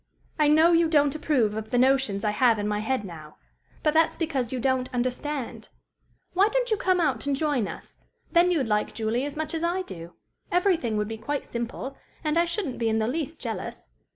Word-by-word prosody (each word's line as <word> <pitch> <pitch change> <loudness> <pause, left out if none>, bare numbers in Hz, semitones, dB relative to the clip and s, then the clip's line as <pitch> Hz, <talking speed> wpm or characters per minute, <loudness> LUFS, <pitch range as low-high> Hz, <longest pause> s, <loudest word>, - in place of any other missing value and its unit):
"I 300 - +5
know 315 +3 +6
you 335 0 +4
don't 290 -3 +3
approve 280 -8 +1
of 220 0 -5
the 245 - +1
notions 260 -6 +2
I 210 - +2
have 230 +1 +3
in 205 0 -2
my 210 0 0
head 220 0 -1
now. 155 -4 -10 0.5
But 305 - +3
that's 320 0 +3
because 275 -8 -1
you 260 - -2
don't 260 0 0
understand. 255 +2 -3 0.6
Why 385 +3 +4
don't - - 0
you - - +5
come 370 -2 +2
out 315 -3 0
and 280 - +2
join 275 -7 0
us? - - -10 0.3
Then 345 +1 +5
you'd 320 -7 +1
like 210 -1 0
Julie 230 +4 -1
as 290 +1 -6
much 315 0 -3
as 325 0 -2
I 355 +2 0
do; 170 - -10 0.4
everything 345 - +2
would 210 0 0
be 225 0 -5
quite 285 +5 -3
simple; 240 +3 -5 0.3
and 305 +1 +2
I 340 - +4
shouldn't 340 - -3
be 230 -1 +1
in 220 - +1
the 220 - +1
least 305 +5 -3
jealous. 220 - -6
270 Hz, 210 wpm, -26 LUFS, 225-320 Hz, 0.6 s, know